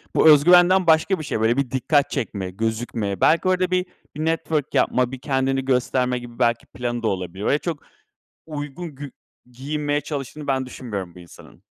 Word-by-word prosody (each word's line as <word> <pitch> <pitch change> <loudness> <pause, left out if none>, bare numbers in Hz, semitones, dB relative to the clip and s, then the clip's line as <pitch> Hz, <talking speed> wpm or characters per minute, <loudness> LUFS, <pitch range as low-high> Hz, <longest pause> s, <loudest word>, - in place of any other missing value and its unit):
bu 160 - +6
öz 150 -2 +7
güvenden 180 +2 +5
başka 160 +4 +3
bir - - -5
şey. 120 -5 -3
Böyle, 115 +3 +2
bir 140 -2 -1
dikkat 140 +2 +2
çekmek, 100 -7 -4
gözükme. 110 -3 -2
Belki 165 +3 +4
orada 185 0 +1
bir 180 0 +1 0.3
bir 155 +1 -3
network 160 -2 -1
yapmak, 125 -1 +2
bir 130 - -7
kendini 135 0 -1
gösterme 125 -1 +1
gibi 120 -1 -12
belki 115 0 +1
planı 120 -1 -4
da - - +1
olabilir. 95 -1 -4
Öyle 145 - +2
çok 165 -3 -5 0.6
uygun 150 +1 -7
gü 145 -1 -8 0.4
giyinmeye 145 +3 -2
çalıştığını 145 0 -6
ben 130 -1 0
düşünmüyorum 100 -9 -6
bu - - -12
insanın. 85 -1 -16
135 Hz, 180 wpm, -22 LUFS, 120-155 Hz, 0.6 s, öz